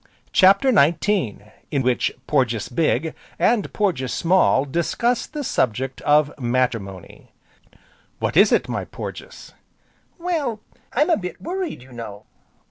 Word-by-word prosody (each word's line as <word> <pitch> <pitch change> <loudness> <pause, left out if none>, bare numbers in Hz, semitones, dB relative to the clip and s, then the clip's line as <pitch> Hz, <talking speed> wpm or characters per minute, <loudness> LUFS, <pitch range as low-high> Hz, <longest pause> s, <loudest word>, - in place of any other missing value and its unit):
CHAPTER 200 +8 +5
XIX 165 - +2 0.3
In 140 -3 0
which 125 0 +1
Porges 120 -7 0
Big, 155 +2 0 0.2
and 230 -3 +2
Porges 170 -12 -1
Small 170 -6 +3
discuss 190 - 0
the 300 -1 -5
subject 130 - -1
of 150 0 +3
Matrimony 120 -7 -3 0.8
"What - - -2
is 200 +4 +6
it, - - +2
my - - -3
Porges?" - - -9 0.6
"Well, 325 - -2 0.3
I'm 295 +7 +2
a - - +4
bit 180 -4 -6
worried, 355 - -4
you 130 - -17
know." 105 -4 -8
155 Hz, 125 wpm, -22 LUFS, -, 0.8 s, is